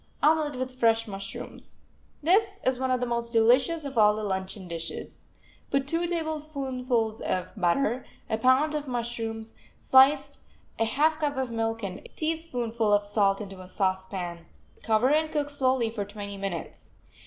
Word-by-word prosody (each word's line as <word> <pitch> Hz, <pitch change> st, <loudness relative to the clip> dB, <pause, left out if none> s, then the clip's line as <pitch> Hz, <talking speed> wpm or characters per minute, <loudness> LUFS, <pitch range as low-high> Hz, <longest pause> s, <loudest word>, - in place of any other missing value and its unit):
OMELET 305 Hz, -2 st, +3 dB
WITH 255 Hz, 0 st, -5 dB
FRESH 225 Hz, -1 st, +3 dB
MUSHROOMS 195 Hz, -1 st, -7 dB, 0.5 s
This 395 Hz, +5 st, +3 dB
is 260 Hz, -1 st, +2 dB
one 260 Hz, 0 st, 0 dB
of 255 Hz, -1 st, +2 dB
the 250 Hz, -, 0 dB
most 235 Hz, -1 st, -2 dB
delicious 255 Hz, +8 st, +4 dB
of 270 Hz, -4 st, -2 dB
all 210 Hz, 0 st, +6 dB
the 215 Hz, -, -4 dB
luncheon 190 Hz, -1 st, -3 dB
dishes. 165 Hz, -1 st, -7 dB, 0.4 s
Put 275 Hz, 0 st, 0 dB
two 335 Hz, +3 st, 0 dB
tablespoonfuls 275 Hz, -9 st, -2 dB
of 185 Hz, 0 st, -1 dB
butter, 225 Hz, +6 st, +1 dB, 0.2 s
a 220 Hz, -, -1 dB
pound 260 Hz, +6 st, +4 dB
of 300 Hz, -1 st, -3 dB
mushrooms, 230 Hz, -2 st, -3 dB, 0.2 s
sliced, 280 Hz, +2 st, +4 dB, 0.4 s
a 225 Hz, -, +3 dB
half 310 Hz, +7 st, +2 dB
cup 290 Hz, -3 st, -1 dB
of 260 Hz, -2 st, -1 dB
milk 225 Hz, 0 st, -2 dB
and 190 Hz, -1 st, -4 dB
a -, -, -14 dB
teaspoonful 245 Hz, -9 st, -1 dB
of 205 Hz, 0 st, +3 dB
salt 205 Hz, -1 st, +2 dB
into 195 Hz, -2 st, -8 dB
a 185 Hz, -, -11 dB
saucepan. 185 Hz, -3 st, -2 dB, 0.3 s
Cover 225 Hz, +4 st, +3 dB
and 310 Hz, 0 st, +2 dB
cook 290 Hz, -1 st, -1 dB
slowly 260 Hz, -5 st, +1 dB
for 215 Hz, -3 st, -3 dB
twenty 200 Hz, 0 st, -7 dB
minutes. 195 Hz, -5 st, -6 dB
235 Hz, 160 wpm, -27 LUFS, 205-280 Hz, 0.5 s, all